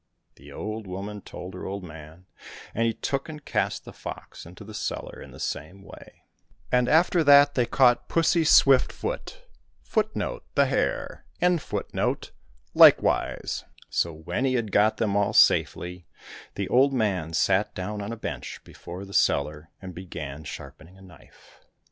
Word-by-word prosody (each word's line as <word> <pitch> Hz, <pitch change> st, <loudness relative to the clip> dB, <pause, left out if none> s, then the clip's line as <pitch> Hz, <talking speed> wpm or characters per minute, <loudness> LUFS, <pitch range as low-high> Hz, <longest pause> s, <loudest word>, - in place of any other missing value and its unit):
The 70 Hz, +2 st, -15 dB
old 110 Hz, +6 st, -6 dB
woman 100 Hz, +3 st, -6 dB
told 90 Hz, 0 st, -9 dB
her 90 Hz, -, -7 dB
old 100 Hz, 0 st, -5 dB
man, 80 Hz, +1 st, -12 dB, 0.5 s
and 115 Hz, +1 st, +1 dB
he 115 Hz, -, 0 dB
took 140 Hz, +5 st, -3 dB
and 150 Hz, -2 st, -9 dB
cast -, -, -1 dB
the -, -, -10 dB
fox -, -, -9 dB
into 90 Hz, +5 st, -12 dB
the 110 Hz, +1 st, -11 dB
cellar -, -, -5 dB
in -, -, -11 dB
the -, -, -13 dB
same 95 Hz, +1 st, -5 dB
way. -, -, -15 dB, 0.5 s
And 125 Hz, -1 st, +3 dB
after 170 Hz, +1 st, +4 dB
that 145 Hz, 0 st, +7 dB
they 120 Hz, -2 st, +1 dB
caught 125 Hz, -2 st, +3 dB
Pussy 165 Hz, 0 st, +2 dB
Swift 135 Hz, -3 st, +5 dB
foot -, -, -6 dB, 0.4 s
^ 180 Hz, -5 st, -1 dB, 0.4 s
likewise. -, -, +4 dB, 0.3 s
So 85 Hz, -, 0 dB
when 80 Hz, +11 st, -3 dB
he 130 Hz, -1 st, +1 dB
had 115 Hz, -4 st, -2 dB
got 105 Hz, +2 st, +3 dB
them 105 Hz, -3 st, 0 dB
all 100 Hz, -1 st, +1 dB
safely, 90 Hz, 0 st, +2 dB, 0.5 s
the 100 Hz, -2 st, -3 dB
old 135 Hz, +3 st, +4 dB
man 95 Hz, -9 st, -1 dB
sat 95 Hz, +5 st, +1 dB
down 105 Hz, +3 st, -4 dB
on 100 Hz, +2 st, -5 dB
a 115 Hz, -, -5 dB
bench -, -, -6 dB
before 90 Hz, +3 st, -9 dB
the 100 Hz, -, -12 dB
cellar 75 Hz, 0 st, +1 dB
and 95 Hz, -1 st, -7 dB
began 80 Hz, -5 st, -7 dB
sharpening 80 Hz, +4 st, -10 dB
a 95 Hz, -, -16 dB
knife. 90 Hz, -6 st, -19 dB
100 Hz, 150 wpm, -26 LUFS, 90-130 Hz, 0.5 s, that